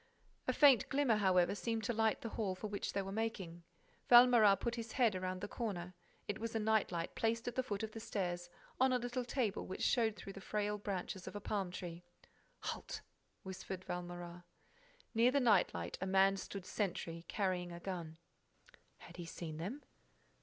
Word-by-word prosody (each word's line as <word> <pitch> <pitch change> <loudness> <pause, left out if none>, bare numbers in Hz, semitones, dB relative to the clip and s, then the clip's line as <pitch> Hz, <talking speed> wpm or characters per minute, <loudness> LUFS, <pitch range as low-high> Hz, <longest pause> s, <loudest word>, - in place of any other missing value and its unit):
A - - +4
faint 275 -7 +6
glimmer, 270 -6 +3
however, 185 -3 +4
seemed 225 +1 -2
to 240 +3 0
light 220 -1 +2
the 230 - -4
hall 205 -4 -2
for 185 - -7
which 205 -1 -3
they 195 - 0
were 195 - -5
making. 195 -6 -3 0.5
Valméras 240 -5 +8
put 235 - -1
his 230 -1 -5
head 240 -5 +4
round 185 0 -3
the 205 - -3
corner. 185 -6 -4 0.3
It 205 - -2
was 230 0 -4
a - - +2
night 220 -2 +2
light 170 -1 -3
placed 230 +1 0
at 245 - -1
the 260 - +1
foot 215 -5 -3
of 220 - -3
the 225 - -7
stairs, 175 -5 -3 0.3
on 260 0 +5
a 255 - +4
little 245 +1 -2
table 240 -4 -1
which 185 - -4
showed 225 -4 +3
through 195 - -8
the 195 - -9
frail 210 +1 -1
branches 190 -2 -4
of - - -7
a - - -3
palm 200 -2 -2
tree. 175 -1 -6 0.6
"Halt!" - - -4 0.4
whispered 190 0 -6
Valméras. 175 0 -5 0.7
Near 230 +2 +5
the 280 +2 +3
night 215 -8 +4
light, 85 0 -5
a 190 - -1
man 195 +1 +5
stood 195 0 -6
sentry, 170 -5 -2
carrying 185 -3 -1
a 170 - -7
gun. 170 -4 -5 0.8
Had - - -12
he 175 - -5
seen 160 -2 -6
them? 210 - -5
200 Hz, 190 wpm, -37 LUFS, 180-225 Hz, 0.8 s, Valméras